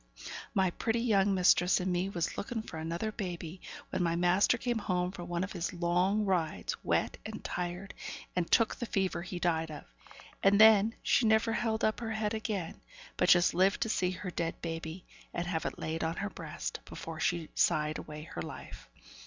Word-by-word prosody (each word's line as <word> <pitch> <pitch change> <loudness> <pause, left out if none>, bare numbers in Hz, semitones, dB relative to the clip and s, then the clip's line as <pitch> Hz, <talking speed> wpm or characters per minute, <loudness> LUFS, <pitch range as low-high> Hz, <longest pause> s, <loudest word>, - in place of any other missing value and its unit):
My 190 -2 +3
pretty 230 +5 -1
young 200 -4 +3
mistress 180 0 +4
and 185 0 0
me 180 +2 0
was 170 -4 -2
looking 225 +1 -3
for 160 - -8
another 170 +7 -2
baby, 180 -4 -5 0.3
when - - -1
my 170 -1 +1
master 180 +7 +4
came 240 -1 -1
home 180 -3 0
from 175 -2 -8
one 175 0 -1
of 200 - -4
his 175 -2 -2
long 180 +4 +2
rides, 175 -5 0
wet - - 0
and - - -7
tired, 180 +2 -4 0.4
and 180 -2 0
took 230 - +4
the 240 - -5
fever 190 -4 0
he 180 0 -5
died 165 -2 0
of; 150 - -7 0.6
and 200 +1 +5
then 220 0 +7
she 230 - +3
never 220 +1 +3
held 225 -1 0
up 215 - +2
her 225 -2 -3
head 215 0 -1
again, 210 -6 -3 0.3
but - - +2
just 175 0 +6
lived 190 +3 +3
to 225 - +1
see 185 -4 +1
her 185 0 -5
dead 170 -1 -2
baby, 165 +1 -5 0.3
and 175 - -1
have 170 -2 -1
it - - -5
laid 160 +1 -3
on 160 +1 -1
her 200 +1 -3
breast, 165 -2 -5
before 165 -1 -7
she 165 -1 0
sighed 150 0 +2
away 150 0 -8
her 120 - -6
life. - - -9
180 Hz, 195 wpm, -31 LUFS, 170-210 Hz, 0.6 s, then